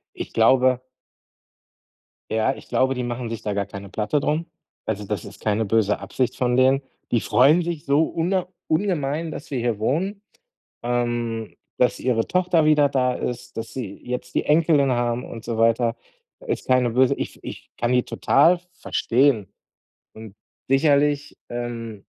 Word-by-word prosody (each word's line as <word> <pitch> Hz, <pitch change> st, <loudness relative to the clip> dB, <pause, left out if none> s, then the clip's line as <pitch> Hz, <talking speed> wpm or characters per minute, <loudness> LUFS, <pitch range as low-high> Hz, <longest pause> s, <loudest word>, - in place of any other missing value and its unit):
Ich -, -, -6 dB
glaube 125 Hz, +2 st, +4 dB, 1.5 s
ja, 110 Hz, +4 st, +2 dB
ich -, -, -13 dB
glaube, 130 Hz, 0 st, +2 dB
die 125 Hz, -1 st, -3 dB
machen 120 Hz, -1 st, -4 dB
sich 115 Hz, -2 st, -5 dB
da 105 Hz, -2 st, -2 dB
gar 100 Hz, 0 st, -1 dB
keine 100 Hz, 0 st, -9 dB
Platte 105 Hz, +8 st, 0 dB
darum. 155 Hz, +4 st, -1 dB, 0.4 s
Also, 105 Hz, -1 st, -3 dB
das 100 Hz, -3 st, -3 dB
ist -, -, -11 dB
keine 110 Hz, +1 st, 0 dB
böse 105 Hz, -1 st, +2 dB
Absicht 130 Hz, -2 st, -2 dB
von 125 Hz, -1 st, +1 dB
denen. 130 Hz, +1 st, +4 dB, 0.3 s
Die 120 Hz, -, +2 dB
freuen 145 Hz, +8 st, +4 dB
sich 170 Hz, -3 st, -4 dB
so 140 Hz, +3 st, +3 dB
una 175 Hz, +3 st, -1 dB, 0.2 s
ungemein, 160 Hz, -3 st, 0 dB
dass -, -, -8 dB
wir 135 Hz, -, -2 dB
hier 120 Hz, -3 st, -1 dB
wohnen, 185 Hz, -, -1 dB, 0.6 s
ähm, 120 Hz, -2 st, -2 dB, 0.2 s
dass 125 Hz, -, +2 dB
ihre 120 Hz, -3 st, 0 dB
Tochter 180 Hz, -3 st, +2 dB
wieder 150 Hz, -1 st, +5 dB
da 130 Hz, -2 st, +1 dB
ist, 125 Hz, -1 st, -5 dB
dass 115 Hz, 0 st, -5 dB
sie 110 Hz, -7 st, -5 dB
jetzt 125 Hz, 0 st, -5 dB
die -, -, +1 dB
Enkelin 150 Hz, -3 st, +3 dB
haben 120 Hz, 0 st, 0 dB
und 115 Hz, -, -9 dB
so 115 Hz, -1 st, -3 dB
weiter. 115 Hz, +1 st, +2 dB, 0.5 s
Ist 445 Hz, -, -3 dB
keine 125 Hz, -2 st, +3 dB
böse 130 Hz, +2 st, +3 dB
ich -, -, -6 dB
ich -, -, -9 dB
kann 120 Hz, +1 st, 0 dB
die 125 Hz, -1 st, +3 dB
total 170 Hz, +6 st, +3 dB
verstehen 125 Hz, -, +1 dB, 0.7 s
und 110 Hz, -2 st, -11 dB, 0.3 s
sicherlich, 145 Hz, +1 st, +2 dB
ähm 115 Hz, -3 st, -5 dB
125 Hz, 160 wpm, -23 LUFS, 115-145 Hz, 1.5 s, wieder